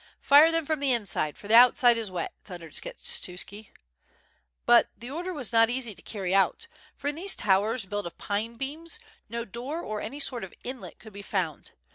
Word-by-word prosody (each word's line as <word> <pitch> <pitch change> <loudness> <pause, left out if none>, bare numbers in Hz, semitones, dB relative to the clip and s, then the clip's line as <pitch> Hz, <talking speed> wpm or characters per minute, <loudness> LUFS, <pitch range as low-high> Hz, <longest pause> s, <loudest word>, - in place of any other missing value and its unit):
"Fire 295 +3 +7
them 330 -1 0
from 310 0 -1
the 280 -2 +1
inside, 200 -10 0
for 205 - -11
the 215 - 0
outside 245 0 +7
is 225 -3 -3
wet," 180 -2 -4
thun 180 -3 -9
dered 165 - -12
Skshetuski. 220 - -4 1.0
But - - +6
the 240 +3 -9
order 350 +5 -4
was 275 -9 -4
not 225 0 +5
easy 245 -3 0
to 175 - -16
carry 190 -4 -4
out; 195 - +2 0.3
for 285 - -6
in - - -1
these 380 +5 0
towers 210 +3 +2
built 205 -1 -3
of 170 - -11
pine 215 +3 -3
beams, 305 - -5 0.3
no 235 +1 -4
door 255 - -5
or 215 -6 -4
any 285 - -6
sort 250 -5 +1
of 190 - -9
inlet 255 0 -7
could 220 -3 -14
be 200 - -8
found. 180 -7 -3
230 Hz, 200 wpm, -27 LUFS, 200-280 Hz, 1.0 s, Fire